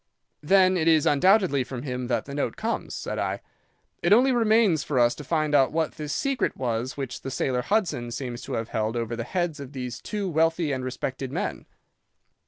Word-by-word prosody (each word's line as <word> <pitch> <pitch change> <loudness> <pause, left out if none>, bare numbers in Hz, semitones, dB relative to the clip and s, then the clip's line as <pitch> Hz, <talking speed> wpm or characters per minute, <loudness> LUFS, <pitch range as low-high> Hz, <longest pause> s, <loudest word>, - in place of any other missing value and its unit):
"'Then 185 +3 +4
it 165 -1 0
is 160 -2 +5
undoubtedly 180 -2 +4
from 125 0 -7
him 125 -3 -4
that 120 -3 -1
the 140 - -8
note 140 -5 -2
comes,' - - -3
said - - -4
I. - - -1 0.6
'It 175 - +1
only 250 +5 +6
remains 220 - +3
for 140 - -2
us 120 -1 +4
to 150 - -9
find 155 0 0
out 135 -2 +4
what 160 0 0
this 150 -2 -6
secret 275 - -1
was 120 +1 -2
which 135 -3 -5
the - - -5
sailor 130 -1 -1
Hudson 170 - 0
seems 120 0 -5
to - - -6
have 115 0 -2
held 110 +1 -1
over 115 0 -2
the 115 - -3
heads 175 +2 -2
of 140 0 -8
these 125 -3 -5
two 205 -2 -3
wealthy 165 -1 +1
and 130 -2 -2
respected 130 +1 -4
men. 180 +8 -4
140 Hz, 200 wpm, -26 LUFS, 125-175 Hz, 0.6 s, only